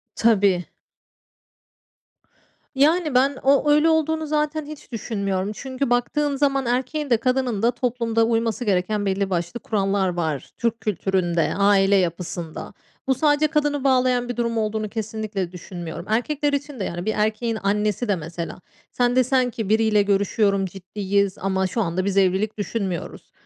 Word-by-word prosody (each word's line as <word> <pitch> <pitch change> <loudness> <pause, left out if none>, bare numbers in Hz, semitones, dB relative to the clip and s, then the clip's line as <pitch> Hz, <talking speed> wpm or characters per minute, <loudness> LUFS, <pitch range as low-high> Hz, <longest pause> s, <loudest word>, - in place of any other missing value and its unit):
Tabii. 200 -6 +3 2.1
Yani, 305 +1 +3
ben 270 +2 +3
o 280 +2 +4
öyle 300 +2 +5
olduğunu 320 0 +1
zaten 300 0 -1
hiç 300 -4 -11
düşünmüyorum 200 -3 -2
çünkü 265 0 -3
baktığın 280 +4 +1
zaman 275 -2 +1
erkeğin 260 +4 -1
de 235 - +5
kadının 250 -3 0
da 235 - +4
toplumda 235 -2 0
uyması 230 +1 0
gereken 205 +1 0
belli 195 0 0
başlı 175 +6 -2
kurallar 195 -2 0
var, 160 -5 -3
Türk 235 -1 -1
kültüründe, 185 -4 0
aile 200 0 +4
yapısında. 170 -2 -3 0.4
Bu, 265 - +4
sadece 295 +2 +3
kadını 295 -2 0
bağlayan 255 -2 +2
bir 245 - -4
durum 235 -1 -1
olduğunu 215 0 -1
kesinlikle 215 -4 -4
düşünmüyorum. 175 -1 -7
Erkekler 285 +6 0
için 285 -4 -3
de, - - -1
yani, 175 +1 -4
bir 220 - 0
erkeğin 220 +1 0
annesi 210 +3 0
de 200 - +2
mesela 165 +1 -6 0.3
Sen 245 0 +1
desen 255 0 +3
ki: 220 -4 -4
"Biriyle 220 -1 +3
görüşüyorum, 200 0 +1
ciddiyiz 195 +1 -2
ama 190 0 0
şu 205 +5 -2
anda 185 +1 -1
biz 200 -1 -1
evlilik 195 +3 +2
düşünmüyoruz." 195 -5 -4
220 Hz, 145 wpm, -23 LUFS, 195-255 Hz, 2.1 s, öyle